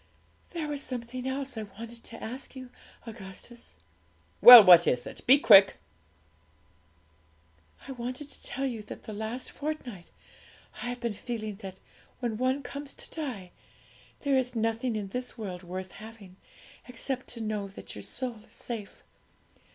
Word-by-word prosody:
'There 330 -3 -4
was 290 -1 -4
something 250 0 -5
else 270 0 -3
I 220 - -4
wanted 230 +3 -10
to 230 - -9
ask 255 +5 -7
you, 255 -1 -9 0.3
Augustus.' 225 - -10 0.6
'Well, 245 -2 +13
what 175 -2 +8
is 125 -1 +1
it? - - -9
Be 265 +3 +8
quick!' 200 -7 +7 2.1
'I - - -6
wanted 255 +3 -6
to - - -9
tell 270 - -3
you 240 -5 -3
that 210 - -10
the 215 - -8
last 220 +4 -5
fortnight 260 - -6 0.7
I 245 - -3
have 245 0 -6
been 235 -3 -2
feeling 215 -2 -5
that 190 -2 -9 0.4
when 235 -4 -2
one 260 +3 0
comes 280 +2 -7
to - - -6
die, 205 - -6 0.7
there 280 -2 +1
is 250 -1 -3
nothing 225 +1 -1
in 205 -2 -4
this 250 +5 -5
world 190 -5 -6
worth 185 +1 -7
having, 215 -4 -12 0.5
except 255 +1 -4
to 235 - -7
know 215 -2 -3
that 195 - -11
your - - -7
soul 245 -4 -4
is - - -16
safe. 225 -4 -6
235 Hz, 155 wpm, -28 LUFS, 210-255 Hz, 2.1 s, Well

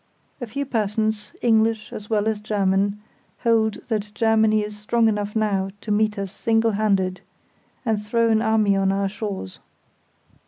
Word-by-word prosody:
A 245 - -4
few 280 +6 -3
persons 215 -3 -1
(English 220 -2 +2
as 210 0 -8
well 215 -1 +1
as 220 -1 0
German) 200 -1 0 0.4
hold 225 -2 +3
that 210 -3 -2
Germany 220 -2 +3
is 210 0 -6
strong 225 +2 +1
enough 210 -1 -1
now 200 -3 0
to 215 - -4
meet 210 0 +1
us 195 -2 -4
single 225 +1 +1
handed, 195 -3 0 0.6
and 220 -3 0
throw 230 +2 +1
an 220 0 +3
army 220 -2 +3
on 195 0 +2
our 195 0 0
shores. 195 - -6
215 Hz, 155 wpm, -23 LUFS, 205-220 Hz, 0.6 s, hold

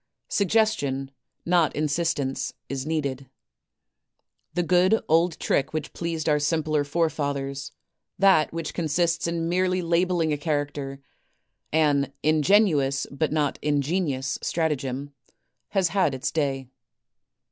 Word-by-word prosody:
Suggestion, 175 -11 +1 0.3
not 170 -3 +2
in 155 - 0
sistence, 145 -3 -1 0.2
is 135 +1 -4
needed. 140 -4 -2 1.3
The 175 - +1
good 185 +5 +4
old 165 +1 +2
trick 135 +1 0
which 155 -1 -4
pleased 165 -2 -3
our 150 -1 +3
simpler 155 0 +1
forefathers, 140 -3 -2 0.5
that 190 -5 +4
which 165 0 -4
consists 170 +1 0
in 165 -1 -1
merely 185 +1 +1
labelling 170 -1 +1
a 145 - -3
character, 145 -2 -3 0.4
— - - -50
an 145 -3 +2
ingenuous, 155 -3 +3
but 145 +2 -1
not 150 -3 0
ingenious, 145 -1 0
stratagem, 145 -4 -2 0.3
— - - -51
has 190 -3 +3
had 185 -8 +1
its 130 - -2
day. 135 -4 -1
155 Hz, 120 wpm, -25 LUFS, 140-170 Hz, 1.3 s, good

